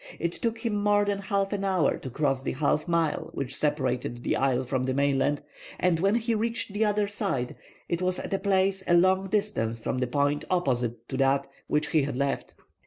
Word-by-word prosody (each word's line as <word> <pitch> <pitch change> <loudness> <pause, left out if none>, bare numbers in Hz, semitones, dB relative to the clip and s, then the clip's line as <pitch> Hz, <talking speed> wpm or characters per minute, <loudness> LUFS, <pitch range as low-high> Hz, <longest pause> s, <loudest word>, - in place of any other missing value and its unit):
It 170 - -1
took 230 +4 -2
him 210 -3 0
more 205 0 +4
than 200 -1 -1
half 200 0 -1
an 200 -1 -2
hour 190 -5 +2
to 130 - -6
cross 135 0 0
the - - -2
half 150 +3 0
mile 170 -2 0
which 135 -1 -3
separated 130 -5 -1
the - - +1
isle 130 -1 +1
from 130 0 -1
the 130 0 -1
mainland, 140 +1 +1 0.4
and 180 -3 +2
when 195 +4 +3
he 230 0 0
reached 225 -1 -1
the 210 +2 +1
other 210 -1 +2
side 195 - -1 0.3
it 170 +1 -1
was 185 0 +1
at - - -5
a 195 - +1
place 190 -1 +1
a 175 - +5
long 185 +2 +4
distance 195 - 0
from 125 - -2
the 125 - 0
point 145 +3 +1
opposite 120 -9 0
to 130 - -3
that 135 +1 +2 0.2
which 150 0 +1
he 160 -3 +3
had 135 -2 -2
left. 140 0 -2
160 Hz, 210 wpm, -27 LUFS, 135-195 Hz, 0.4 s, a